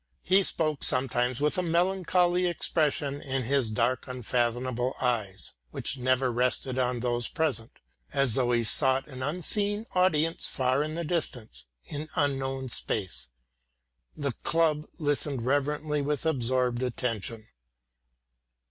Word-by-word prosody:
He 190 +2 +4
spoke 155 -6 0
sometimes 125 -1 +1
with 150 +4 +1
a - - +2
melancholy 180 +1 +2
expression 150 -4 0
in 135 -1 -2
his 130 -1 +1
dark 115 +3 0
unfathomable 125 0 -1
eyes, 105 -8 -2 0.2
which 135 - 0
never 130 0 +2
rested 125 +2 0
on 125 -1 0
those 120 -1 0
present, 135 -8 -1 0.4
as 135 -4 +1
though 125 -1 +1
he 120 -1 +2
sought 130 +3 +3
an 130 -3 -8
unseen 200 +8 0
audience 165 -3 +2
far 130 +1 +1
in 155 +1 -3
the 170 - -2
distance, 120 - -3 0.2
in 150 +2 -5
unknown 135 -3 -1
space. 100 - -3 0.9
The 140 -2 -1
club 155 +3 +1
listened 145 -5 -1
reverently 150 +2 0
with 145 +2 -2
absorbed 125 -4 +1
attention. 115 -3 -3
135 Hz, 125 wpm, -28 LUFS, 125-155 Hz, 0.9 s, He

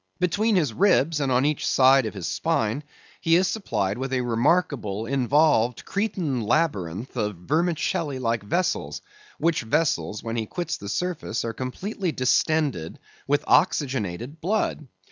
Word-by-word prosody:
Between 205 +5 +1
his 150 -10 +1
ribs 165 - +3
and 135 -2 0
on 125 +2 +3
each 150 -1 0
side 130 -2 +5
of 110 - -7
his 90 -4 -4
spine 110 +7 -1 0.4
he 165 0 +3
is 185 +2 +3
supplied 110 - -2
with 135 0 -3
a 130 - +1
remarkable 120 - 0
involved 135 -1 +2
Cretan 185 - -1
labyrinth 105 - -1
of 105 -4 -1
vermicelli 155 - -1
like 115 -3 -1
vessels, 175 - -2 0.3
which 165 -1 +1
vessels, 110 - 0
when 115 0 -3
he 110 -1 -2
quits 175 +7 -3
the 100 - -8
surface, 165 - -2
are 115 - -3
completely 180 - -3
distended 130 - 0 0.3
with 145 +1 +1
oxygenated 130 - +1
blood. 185 -5 -1
135 Hz, 145 wpm, -25 LUFS, 115-165 Hz, 0.4 s, side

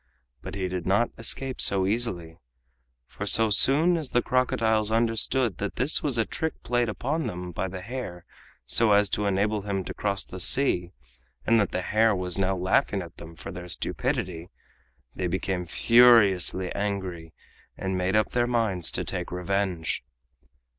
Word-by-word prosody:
But - - -7
he 95 -2 -2
did 90 -1 -5
not 100 +5 +2
escape 130 +3 -1
so 95 -1 +4
easily, 95 -7 -2 0.7
for - - -7
so 110 -1 +4
soon 155 - +4
as 155 -5 -4
the 120 - +1
crocodiles 110 -4 +1
understood 115 0 +1
that 100 - -4
this 135 +5 +1
was 140 -5 -1
a 115 - +2
trick 160 -1 -4
played 120 -1 0
upon 150 +9 -2
them 90 0 -6
by 95 - -3
the 95 0 -7
hare 100 -6 -7 0.4
so 110 - +3
as 100 -1 +4
to 105 0 -1
enable 100 +2 0
him 100 -1 -3
to - - -6
cross 100 -2 -2
the 95 - -10
sea, 90 -5 +1 0.5
and 115 0 +4
that 105 - +1
the 95 - -2
hare 110 +1 +2
was 90 0 -2
now 95 0 +1
laughing 95 +1 +1
at 85 0 -13
them 85 0 -11
for 85 - -8
their 90 0 -8
stupidity, 85 0 -3 0.6
they 90 - -2
became 90 0 -2
furiously 100 -4 +4
angry 95 -5 -4 0.4
and 95 0 -3
made 90 +2 0
up 110 -1 +2
their 120 0 +1
minds 110 -8 0
to - - -1
take 90 - -5
revenge. 90 -1 -2
100 Hz, 165 wpm, -26 LUFS, 90-115 Hz, 0.7 s, so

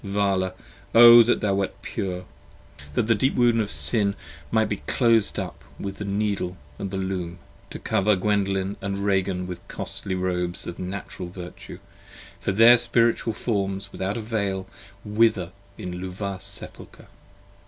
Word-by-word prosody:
Vala! 100 -2 0 0.4
O 120 0 +11
that 115 +1 +2
thou 105 -2 +1
wert 100 -1 -2
pure! 90 -1 -4 0.7
That - - +2
the 115 - +4
deep 130 +6 +1
wound 120 -2 +4
of 105 - -2
Sin 100 +7 0 0.3
might 110 -1 +3
be 105 - -2
clos'd 115 -5 +3
up - - -5 0.2
with 100 0 -5
the 105 - -5
Needle, 100 -2 -1 0.2
And 100 -1 -4
with 95 - -2
the 95 - -1
Loom: 90 -2 -4 0.3
to - - -6
cover 105 +1 +2
Gwendolen 95 0 0
& - - -26
Ragan 100 -2 0
with 90 -1 -8
costly 95 - -4
Robes 90 -1 -1
15 90 +1 -6
Of - - -5
Natural 95 -2 -6
Virtue, 90 -1 -9 0.6
for - - -1
their 115 +5 +8
Spiritual 115 -1 +2
forms 100 -3 -2
without 95 +4 -3
a - - -3
Veil 100 -4 -2 0.4
Wither 105 -4 +2 0.3
in 90 0 -6
Luvah's 95 +1 -5
Sepulchre. - - -8
100 Hz, 155 wpm, -25 LUFS, 95-105 Hz, 0.7 s, O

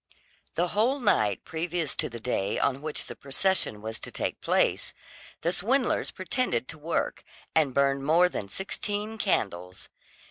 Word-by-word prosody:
The 175 +1 +1
whole 240 +9 +2
night 110 - +2
previous 165 -1 -2
to - - 0
the 120 -1 -7
day 105 -4 -1
on 135 0 +1
which 155 0 -3
the - - -7
procession 140 - 0
was 110 0 -4
to - - -6
take - - -3
place, - - +2 0.5
the 170 - +1
swindlers 245 +8 +2
pretended 185 - -1
to 155 - -6
work, 165 +3 -1 0.3
and 155 -4 +4
burned 140 +1 +2
more 165 +5 +5
than 100 - -5
sixteen 205 - -3
candles. 90 - -1
160 Hz, 150 wpm, -28 LUFS, 125-190 Hz, 0.5 s, more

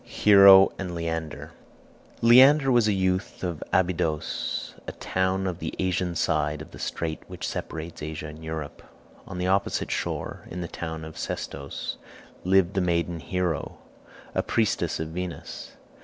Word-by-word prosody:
HERO 100 -2 +7
AND 90 -3 -4
LEANDER 80 -2 -4 0.7
Leander 135 +4 +7
was 120 -3 +4
a - - +3
youth 95 -1 -1
of 85 -4 -3
Abydos, 85 -4 -1
a - - -4
town 95 +1 -1
of 90 -2 -3
the - - -4
Asian 90 -1 -1
side 75 -2 0
of 80 +2 -10
the - - -11
strait 80 -2 -3
which - - -6
separates 80 +1 -5
Asia 80 +1 -5
and 80 +1 -9
Europe. 80 -2 -6 0.5
On - - -7
the 90 - -1
opposite 95 +2 0
shore, - - -3
in 90 - -5
the 85 - -4
town 80 -1 -6
of 80 - -9
Sestos, 70 0 -5 0.5
lived 95 0 +3
the 95 - +1
maiden 85 -1 0
Hero, 85 0 -2 0.6
a - - +1
priestess 110 -3 0
of 80 0 -3
Venus. 90 +1 -6
90 Hz, 150 wpm, -26 LUFS, 80-95 Hz, 0.7 s, HERO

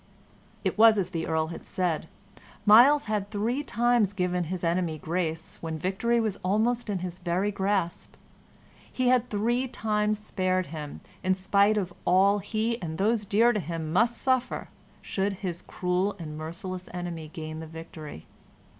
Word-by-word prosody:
It - - -1
was 225 -1 +8
as 185 -2 -1
the 165 -2 -3
Earl 160 -1 0
had - - -9
said; 175 -4 -1 0.6
Myles 250 +8 +7
had 210 -2 -2
three 225 +6 -1
times 240 -6 +2
given 180 -2 0
his 180 +2 -4
enemy 170 -1 0
grace 165 0 -3
when 160 -1 -3
victory 195 +8 +1
was 215 -3 -1
almost 220 +5 0
in 200 - 0
his 180 0 -6
very 185 +3 0
grasp. 195 -3 -1 0.8
He 255 -1 +1
had 250 -1 +3
three 240 +5 0
times 215 -3 0
spared 185 -3 -1
him, 150 -2 -6 0.2
in 185 0 +2
spite 200 +3 +3
of 185 -3 -2
all 195 +3 +4
he 225 +3 -2
and 160 -2 -4
those 210 +2 +1
dear 230 +5 +4
to 210 - 0
him 165 -2 -4
must 230 +5 +3
suffer 260 -1 0 0.3
should 195 +1 -1
his 180 -2 -5
cruel 185 +3 -1
and 155 -4 -7
merciless 180 +4 -6
enemy 175 -3 -5
gain 155 0 -7
the 160 - -7
victory. 155 - -9
190 Hz, 160 wpm, -27 LUFS, 170-215 Hz, 0.8 s, was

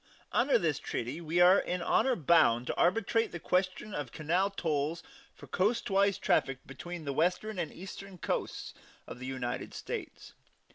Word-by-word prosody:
Under 275 - +4
this 155 -4 0
treaty 130 +6 -4
we 165 +1 0
are 185 +2 +7
in 180 -1 -2
honor 260 -2 +3
bound 140 - +4
to - - -2
arbitrate 225 +5 +2
the 175 - -6
question 185 +4 -1
of 145 -7 -4
canal 175 +6 +1
tolls 160 -4 -2 0.3
for - - -12
coastwise 200 -1 +1
traffic 135 -1 +1
between 170 +4 -7
the 140 - -2
Western 180 +7 0
and 170 - -2
Eastern 195 +1 -9
coasts - - -3 0.3
of 125 - -9
the 130 - -6
United 130 -2 -4
States. - - -6
175 Hz, 155 wpm, -31 LUFS, 145-195 Hz, 0.3 s, are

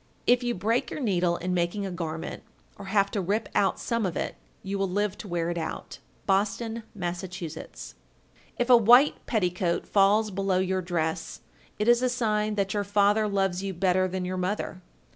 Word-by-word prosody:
If 245 +1 +4
you 240 -1 -1
break 225 +6 0
your - - -5
needle 180 -8 +1
in 180 +1 -2
making 180 +3 -1
a 190 - -4
garment, 165 -3 -5 0.3
or - - -10
have 200 -2 +2
to 205 - -1
rip 205 +4 -1
out 195 -2 +2
some 230 -1 -1
of 185 -4 -2
it, - - -3 0.3
you 195 +1 -3
will 195 -1 0
live 205 +1 0
to - - -7
wear 170 -2 -1
it 170 - -3
out. 160 - -6 0.3
Boston, 215 +4 0
Mass. 175 -2 -3
1391. 175 -4 -8 0.6
If 245 +1 +1
a 245 - +10
white 245 +7 +6
petticoat 180 -5 0
falls 210 +2 +3
below 195 -1 0
your 190 0 0
dress, 170 -2 -3 0.4
it 210 - -1
is 240 0 +5
a 255 - +2
sign 215 -3 0
that 195 -2 0
your 205 -1 0
father 205 +1 +3
loves 195 -2 0
you 195 -1 -4
better 185 +1 +2
than 185 0 -3
your 185 +1 -3
mother. 185 0 -3
195 Hz, 190 wpm, -27 LUFS, 180-210 Hz, 0.6 s, a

